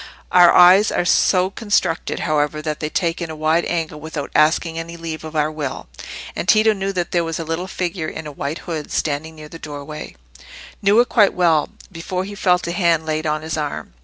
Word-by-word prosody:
Our 175 -1 +7
eyes 185 +4 +7
are - - 0
so 185 +2 +3
constructed, 205 -6 -1
however, 150 -1 0
that 155 -1 -3
they 155 - -3
take 170 +1 -1
in 170 - -4
a 160 - -6
wide 155 +2 +1
angle 160 -3 -3
without 155 -2 -6
asking 160 +1 +2
any 170 +1 -7
leave 165 -1 -6
of 155 0 -8
our 150 0 +1
will; 140 - -5 0.5
and - - -4
Tito 215 +1 +5
knew 195 -1 -3
that 175 -2 -2
there 175 -1 +1
was 165 -1 -3
a 165 - -4
little 165 +3 -3
figure 175 -3 -3
in 160 - -7
a 150 - -6
white 145 +2 -4
hood 160 -4 -5
standing 155 +2 -2
near 155 -1 -10
the 165 - -10
doorway—knew 145 - -4
it 245 - +3
quite 210 -4 +4
well, 165 -4 +2 0.2
before 180 +2 -4
he 200 +2 -7
felt 180 -3 +1
a 170 - -2
hand 170 -3 +1
laid 155 0 -2
on 155 0 -1
his 160 0 -3
arm. 150 - -4
165 Hz, 210 wpm, -20 LUFS, 155-180 Hz, 0.5 s, Our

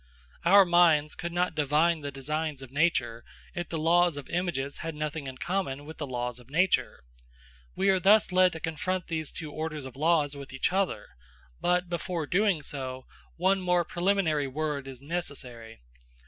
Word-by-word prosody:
Our 195 +3 +7
minds 165 -4 +4
could 170 0 -5
not 175 0 0
divine 155 +2 +2
the 145 - -4
designs 145 +1 -3
of 130 - -11
nature, 140 -6 +1 0.3
if 175 -2 -4
the 165 - -3
laws 170 0 +3
of 145 - -7
images 170 -6 -2
had 165 -2 -5
nothing 150 -1 -4
in 130 -1 -7
common 145 -5 -2
with 160 +1 -10
the 145 - -3
laws 125 -1 -3
of 125 0 -17
nature. 165 - +1 0.7
We 195 +1 +2
are 190 -1 +4
thus 200 +2 +5
led 185 0 +4
to 160 - -6
confront 175 +3 -2
these 160 -3 -3
two 155 -3 -6
orders 155 -2 -4
of 130 - -9
laws 150 -1 +2
with 140 -2 -9
each 130 +7 0
other; 195 -1 0 0.5
but, 180 0 +1
before 170 -1 -3
doing 180 -1 +1
so, 130 -2 -6 0.3
one 190 +2 +2
more 180 -1 +2
preliminary 175 -5 +1
word 145 0 -3
is 135 0 -9
necessary. 125 - -6
160 Hz, 175 wpm, -28 LUFS, 140-175 Hz, 0.7 s, Our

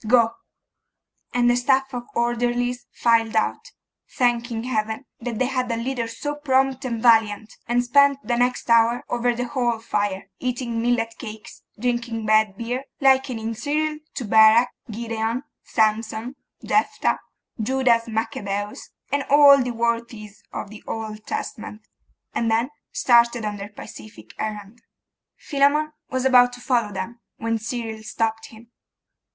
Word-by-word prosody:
Go.' 230 -1 +5 1.0
And 245 -1 +2
the 240 - +4
staff 265 +2 +1
of 245 -1 -5
orderlies 245 +1 0
filed 230 -2 +2
out, 220 - 0 0.4
thanking 240 -2 0
Heaven 220 0 -2
that 235 -1 -4
they 255 - +1
had 250 -1 -1
a 230 - -1
leader 240 0 -2
so 260 +6 -4
prompt 270 -2 +1
and 235 -3 -2
valiant, 220 -2 +3
and 240 +1 +2
spent 280 +3 +4
the 240 +3 0
next 245 +1 0
hour 230 +1 +4
over 240 0 +1
the 245 +1 -2
hall 240 -3 0
fire, 205 -4 -2
eating 240 -2 -2
millet 230 -1 0
cakes, 215 -3 -9 0.2
drinking 235 -2 -2
bad 215 -2 +3
beer, 245 +3 -3
likening 260 -4 +2
Cyril 300 +5 -1 0.2
to 255 - -3
Barak, 220 +3 +6 0.2
Gideon, 230 +2 -3 0.2
Samson, 220 +3 0 0.3
Jephtha, 425 - +1 0.4
Judas 240 -1 +2
Maccabeus, 210 -2 -3 0.2
and 285 +1 +1
all 285 -1 +8
the 250 - -2
worthies 230 -3 -3
of 200 - -6
the 215 - -11
Old 215 -1 -6
Testament, 215 0 -5 0.5
and 230 - 0
then 230 +5 +1 0.2
started 235 -2 +3
on 210 -1 -3
their 200 +1 -7
pacific 210 0 -12
errand. 215 +1 -5 0.6
Philammon 295 +2 +1 0.2
was 260 0 -2
about 245 -1 +6
to 245 - -9
follow 240 -4 0
them, 195 +5 -5 0.2
when 230 0 -1
Cyril 225 -1 -5
stopped 225 0 -2
him. 230 +1 -16
235 Hz, 140 wpm, -23 LUFS, 220-250 Hz, 1.0 s, all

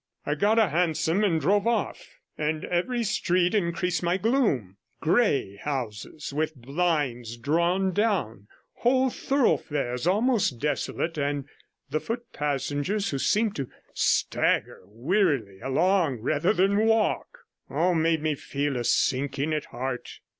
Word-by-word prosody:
I 145 - 0
got 205 +8 +2
a 220 -5 +4
hansom 165 +3 +1
and 170 -6 +2
drove 200 +5 +2
off, 235 - -2 0.2
and 155 0 -2
every 230 +8 0
street 180 -4 +1
increased 180 -3 0
my 175 +1 +1
gloom; 195 - +1 0.2
grey 155 - +1
houses, 130 +2 -5
with 155 +1 -1
blinds 135 -4 -1
drawn 170 +8 +1
down, 175 - 0 0.3
whole 260 +1 +2
thoroughfares 150 - 0
almost 210 - +2
desolate, 150 +3 -2
and 140 -1 -1 0.5
the 155 - +1
foot 235 +8 -4
passengers 145 +7 -1
who 140 - -2
seem 215 +8 +2
to 135 -9 -5 0.2
stagger - - +1
wearily 120 - 0
along 160 - +1
rather 145 - +1
than 200 +2 +2
walk, 225 - +1 0.3
all 180 +2 +1
made 160 -1 +1
me 155 -1 +1
feel 140 -1 -3
a 120 - -2
sinking 140 +5 +1
at 150 -2 -2
heart. 125 +1 -5
160 Hz, 130 wpm, -26 LUFS, 140-200 Hz, 0.5 s, a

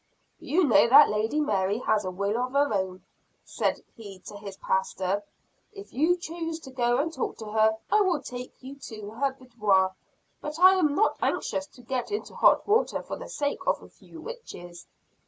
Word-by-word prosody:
"You 360 +5 +1
know 230 -6 +5
that 280 +5 +8
Lady 220 +8 0
Mary 200 -7 +1
has 220 -3 +1
a - - -1
will 200 +3 -2
of 250 +2 -2
her 285 -4 +2
own," 190 -2 -2 0.4
said - - -2
he 200 -4 -10
to 205 - -9
his 200 -2 -9
pastor. 190 +1 -1 0.5
"If 400 0 -11
you 325 +7 +2
choose 330 -1 -5
to 265 - -11
go 240 -2 +1
and 320 +4 -1
talk 260 - -3
to 220 - -8
her, 220 0 +3
I 425 - +5
will 365 -6 +2
take 250 +1 -9
you 270 +2 -9
to 215 -2 -8
her 270 +4 -1
boudoir; 210 -8 +1 0.5
but 300 +1 -5
I 370 +2 +8
am 310 -6 +2
not 430 - +2
anxious 285 0 -1
to 250 -4 -18
get 255 - -3
into 415 - -4
hot - - +4
water 430 +3 +2
for - - -5
the - - -9
sake 285 -11 -2
of - - +1
a - - -14
few 330 - -15
witches." 175 - -10
250 Hz, 190 wpm, -27 LUFS, 205-305 Hz, 0.5 s, that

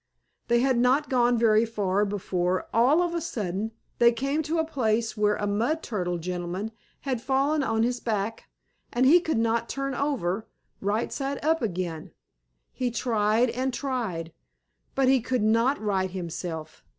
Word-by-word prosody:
They 235 0 +3
had 260 -2 +2
not 265 +5 +2
gone 245 -1 +3
very 225 -1 +4
far 205 -3 0
before, 185 -2 -1
all 265 +10 +4
of 345 -1 -2
a 340 - -1
sudden, 210 - -3 0.3
they 235 0 +7
came 275 +6 -1
to 315 +2 -2
a 320 - +2
place 230 -7 0
where 210 -1 +2
a 205 - -2
mud 230 +11 0
turtle 180 -5 -2
gentleman 180 +4 -4 0.3
had 260 -4 -2
fallen 275 +4 +1
on 225 -4 +1
his 245 +1 0
back, 220 0 -3 0.4
and 245 +2 +2
he 320 +7 +7
could 320 -6 -1
not 230 0 +1
turn 275 0 -2
over, 225 -9 -1 0.3
right 210 +4 -1
side 275 0 -2
up 320 0 +2
again. 175 -7 -3 0.6
He 250 -1 -1
tried 230 0 +1
and 260 +2 -1
tried, 225 - -3 0.6
but 270 -1 +3
he 260 -1 +4
could 245 -1 -1
not 230 +6 +3
right 195 -3 0
himself. 170 -3 -6
230 Hz, 160 wpm, -26 LUFS, 200-265 Hz, 0.6 s, they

